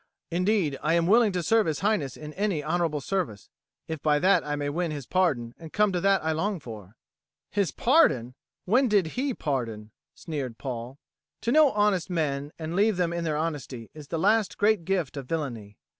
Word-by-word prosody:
"Indeed 180 Hz, -5 st, +1 dB
I 165 Hz, +2 st, +2 dB
am 170 Hz, -1 st, +2 dB
willing 220 Hz, +3 st, +5 dB
to 180 Hz, -1 st, -1 dB
serve 225 Hz, +3 st, +3 dB
His 155 Hz, -2 st, -2 dB
Highness 195 Hz, -, 0 dB
in 150 Hz, 0 st, -8 dB
any 195 Hz, -5 st, -1 dB
honourable 160 Hz, -2 st, 0 dB
service, 145 Hz, -, -3 dB, 0.4 s
if 160 Hz, -3 st, -5 dB
by 150 Hz, -1 st, +3 dB
that 180 Hz, +2 st, +3 dB
I 145 Hz, 0 st, -2 dB
may 145 Hz, 0 st, -3 dB
win 165 Hz, +4 st, -1 dB
his 145 Hz, -4 st, -5 dB
pardon 135 Hz, -11 st, 0 dB
and 165 Hz, -2 st, -10 dB
come 210 Hz, -1 st, +2 dB
to 180 Hz, -2 st, -1 dB
that 195 Hz, -1 st, +3 dB
I 160 Hz, -, +2 dB
long 185 Hz, +5 st, -1 dB
for." 110 Hz, -6 st, -10 dB, 0.6 s
"His 200 Hz, -3 st, +1 dB
pardon! 145 Hz, -, +3 dB, 0.3 s
When 250 Hz, +8 st, +3 dB
did 200 Hz, -7 st, +2 dB
he 260 Hz, 0 st, -1 dB
pardon?" 115 Hz, -7 st, -3 dB, 0.2 s
sneered 140 Hz, -8 st, -5 dB
Paul. 125 Hz, 0 st, -6 dB, 0.4 s
To 235 Hz, -, 0 dB
know 305 Hz, +1 st, +6 dB
honest 205 Hz, -4 st, +1 dB
men 145 Hz, -4 st, -1 dB
and 160 Hz, +1 st, -5 dB
leave 205 Hz, 0 st, +3 dB
them 175 Hz, -2 st, +1 dB
to 170 Hz, 0 st, -2 dB
their 155 Hz, -3 st, -1 dB
honesty 145 Hz, -7 st, -4 dB
is 150 Hz, -2 st, -11 dB
the 165 Hz, -, -3 dB
last 210 Hz, +4 st, +2 dB
great 205 Hz, -4 st, +2 dB
gift 175 Hz, -7 st, -1 dB
of 135 Hz, -2 st, -6 dB
villainy. 120 Hz, -11 st, -4 dB
165 Hz, 195 wpm, -27 LUFS, 140-195 Hz, 0.6 s, know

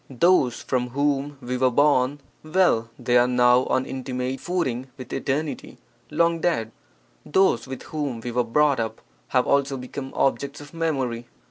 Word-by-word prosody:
Those 135 Hz, -2 st, +2 dB
from 125 Hz, -2 st, -1 dB
whom 145 Hz, 0 st, 0 dB
we 125 Hz, +1 st, -2 dB
were 130 Hz, 0 st, +3 dB
born, 140 Hz, +1 st, +2 dB, 0.2 s
well, 155 Hz, -9 st, +2 dB
they 125 Hz, 0 st, +2 dB
are 120 Hz, -, +4 dB
now 125 Hz, 0 st, +4 dB
on 130 Hz, 0 st, 0 dB
intimate 130 Hz, 0 st, -4 dB
footing 135 Hz, -9 st, -2 dB
with 130 Hz, -3 st, -9 dB
Eternity 145 Hz, -2 st, -3 dB, 0.3 s
(long 170 Hz, +2 st, +2 dB
dead); 115 Hz, -11 st, 0 dB, 0.5 s
those 150 Hz, -, +2 dB
with 130 Hz, -1 st, -7 dB
whom 145 Hz, -6 st, -4 dB
we 120 Hz, +1 st, -5 dB
were 125 Hz, +1 st, +1 dB
brought 140 Hz, +4 st, +2 dB
up 110 Hz, -1 st, -3 dB, 0.3 s
have 125 Hz, -1 st, +2 dB
also 140 Hz, -1 st, +1 dB
become 130 Hz, +2 st, -7 dB
objects 140 Hz, +1 st, 0 dB
of 145 Hz, +1 st, -12 dB
memory. 135 Hz, -8 st, -2 dB
130 Hz, 155 wpm, -24 LUFS, 125-145 Hz, 0.5 s, are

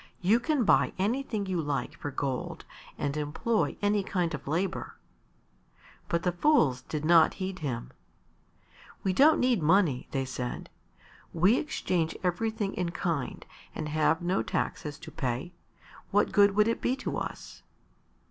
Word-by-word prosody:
"You 205 Hz, +6 st, +4 dB
can 285 Hz, +1 st, +1 dB
buy -, -, +3 dB
anything 215 Hz, +1 st, -1 dB
you 185 Hz, -3 st, -1 dB
like 145 Hz, -4 st, -2 dB
for 145 Hz, -, -5 dB
gold 135 Hz, -2 st, -4 dB, 0.3 s
and 145 Hz, -1 st, -2 dB
employ 155 Hz, +10 st, -1 dB
any 205 Hz, 0 st, +3 dB
kind 180 Hz, -3 st, -1 dB
of 150 Hz, -, -6 dB
labour." 175 Hz, +6 st, -2 dB, 1.1 s
But 170 Hz, -1 st, 0 dB
the 180 Hz, -, +2 dB
fools 175 Hz, -, +3 dB
did 155 Hz, -1 st, -4 dB
not 165 Hz, -1 st, +5 dB
heed 190 Hz, -1 st, -4 dB
him. 125 Hz, -, -4 dB, 1.1 s
"We 190 Hz, -, +1 dB
don't 300 Hz, +10 st, +5 dB
need 250 Hz, -6 st, +2 dB
money," 160 Hz, -5 st, +3 dB
they 135 Hz, -1 st, -1 dB
said. 125 Hz, -1 st, -5 dB, 0.6 s
"We 185 Hz, +9 st, +4 dB
exchange 175 Hz, -, -1 dB
everything 205 Hz, +3 st, -1 dB
in 180 Hz, -2 st, -2 dB
kind 165 Hz, -5 st, -3 dB, 0.3 s
and 150 Hz, -, -4 dB
have 155 Hz, +3 st, +1 dB
no 180 Hz, +2 st, +1 dB
taxes 150 Hz, -2 st, -3 dB
to -, -, -11 dB
pay; 130 Hz, +7 st, -3 dB, 0.6 s
what 205 Hz, +1 st, +2 dB
good 200 Hz, -1 st, +5 dB
would 210 Hz, +1 st, +4 dB
it 230 Hz, -, -1 dB
be 255 Hz, -, +1 dB
to 265 Hz, -, -4 dB
us?" -, -, -6 dB
180 Hz, 150 wpm, -29 LUFS, 150-205 Hz, 1.1 s, not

